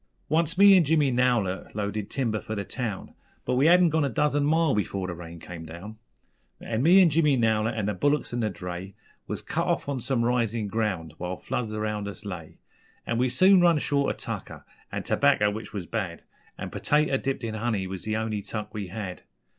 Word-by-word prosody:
_ - - -45 0.3
Once 165 +3 +1
me 200 0 +8
and 180 - +6
Jimmy 150 -3 +3
Nowlett 120 -8 0
loaded 105 0 -3
timber 115 -6 -1
for 110 - -5
the 100 -1 -3
town, 110 -5 -4 0.3
But - - 0
we 135 +4 +4
hadn't 175 0 +6
gone 160 0 +2
a 140 - +1
dozen 145 +4 +1
mile 160 0 +3
before 100 -2 -1
the 90 - -4
rain 85 0 -9
come 85 0 -9
down, 100 +7 -9 0.6
An' 115 0 -2
me 180 +6 +7
an' 170 - +4
Jimmy 150 -3 +3
Nowlett 110 -1 +1
an' 110 -3 -1
the 105 - 0
bullicks 145 +7 0
an' 120 - -1
the 110 -2 0
dray 90 +1 -7 0.3
Was - - -4
cut - - -2
off - - 0
on 140 -2 -2
some 120 -1 0
risin' 115 -3 0
ground 95 -8 -2
while 90 +1 -4
floods 110 -3 -3
around 105 -1 -2
us 100 +2 -8
lay; 90 -6 -7 0.5
An' 115 0 -1
we 125 +1 +2
soon 185 +9 +5
run 170 -2 +5
short 140 -1 +1
of - - -22
tucker - - -6 0.3
an' - - -3
terbacca, 105 -1 +3
which 110 +2 -7
was 100 -4 -5
bad, - - -4 0.3
An' - - -6
pertaters 150 -2 +1
dipped 135 -2 -2
in 115 -1 -3
honey 110 -3 -1
was 95 -1 -6
the 110 0 -2
only 110 -2 -2
tuck 105 +1 -6
we 105 -3 -4
had. 95 -1 -6
110 Hz, 210 wpm, -26 LUFS, 100-140 Hz, 0.6 s, me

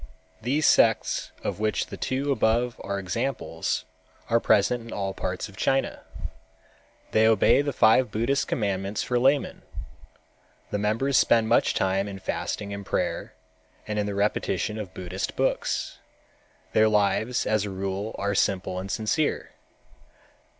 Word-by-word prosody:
These 140 +7 +1
sects - - +3
of - - -3
which 110 0 0
the - - -8
two 135 +2 -1
above 120 -1 +1
are 100 0 -2
examples 115 +8 -2 0.5
are 115 - +5
present 115 +3 +3
in 115 - -10
all 95 -1 -2
parts 90 0 -3
of 100 - -15
China. 135 +6 0 1.1
They 110 0 +4
obey 110 +4 +5
the 145 0 -1
five 125 0 +4
Buddhist 120 +7 0
commandments 100 -2 -1
for 125 -1 0
laymen. 135 +3 +2 1.1
The 105 - -1
members 115 +6 +1
spend 115 -1 +3
much 120 - +3
time 95 +1 +1
in 100 -1 -6
fasting 100 +1 -4
and 100 0 -6
prayer, - - -2 0.5
and 105 0 -2
in 105 - 0
the 100 - -3
repetition 105 +1 0
of 100 -4 -6
Buddhist 90 +1 -4
books. - - -1 0.7
Their 110 0 +5
lives 110 +3 +1
as 110 -1 +1
a - - -4
rule 95 +2 -4
are 100 0 -1
simple 95 -2 0
and 95 +1 -6
sincere. 115 +8 -1
105 Hz, 145 wpm, -26 LUFS, 100-120 Hz, 1.1 s, are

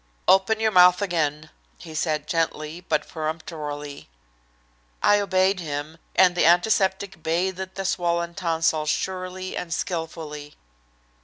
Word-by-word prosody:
"Open 195 +4 +4
your 220 0 +2
mouth 180 -1 +7
again," 155 -5 -1 0.3
he 160 -3 -11
said 155 -1 -1
gently, 165 0 -2
but 150 - +1
peremptorily. 150 - -6 0.9
I 205 - +5
obeyed 190 -1 +2
him, 155 0 -5 0.2
and 185 -1 +6
the 175 - +1
antiseptic 190 +1 +2
bathed 185 +3 -2
the 195 - -4
swollen 170 -2 0
tonsils 165 -4 0
surely 185 +2 -3
and 175 - -5
skilfully. 160 -4 -4
170 Hz, 120 wpm, -24 LUFS, 155-185 Hz, 0.9 s, mouth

